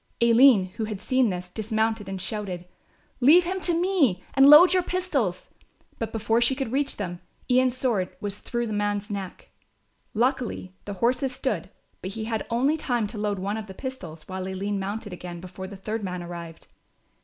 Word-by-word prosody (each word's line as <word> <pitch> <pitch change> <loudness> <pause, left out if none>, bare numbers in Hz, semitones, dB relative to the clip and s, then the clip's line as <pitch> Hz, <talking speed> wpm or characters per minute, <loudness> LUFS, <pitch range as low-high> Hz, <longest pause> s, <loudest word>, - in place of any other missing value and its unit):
Aline, 235 -5 +6
who 225 - -1
had 215 -2 -5
seen 255 +2 +2
this, 180 -1 -5
dismounted 220 0 -1
and 190 -1 -4
shouted: 185 -3 -4 0.5
"Leave 305 +8 +7
him 370 +2 -2
to 345 -2 +1
me 310 - +2
and 270 0 +7
load 330 +5 +9
your 370 - +4
pistols"; 300 - -2 0.5
but 225 -1 -3
before 225 +1 +1
she 240 +3 +3
could 265 -4 -3
reach 275 +2 0
them, 175 -4 -5 0.3
Ian's 255 0 +3
sword 225 -9 0
was 205 0 -4
through 240 0 -3
the 215 - -4
man's 205 0 -1
neck. 195 -2 -6 0.6
Luckily 240 -5 -1
the 205 - -4
horses 250 +5 0
stood; - - -2 0.3
but 190 +2 -5
he 220 -1 -4
had 220 -1 -3
only 265 +7 +2
time 245 -7 0
to 210 +1 -6
load 205 -1 -1
one 200 +3 -2
of 220 -1 -6
the 190 - -10
pistols, 180 - -7
while 185 0 -4
Aline 195 +2 -2
mounted 205 +1 -4
again, 175 -1 -7
before 185 +1 -8
the 195 0 -9
third 215 +3 -4
man 180 -2 -4
arrived. 170 -1 -8
215 Hz, 185 wpm, -26 LUFS, 190-255 Hz, 0.6 s, load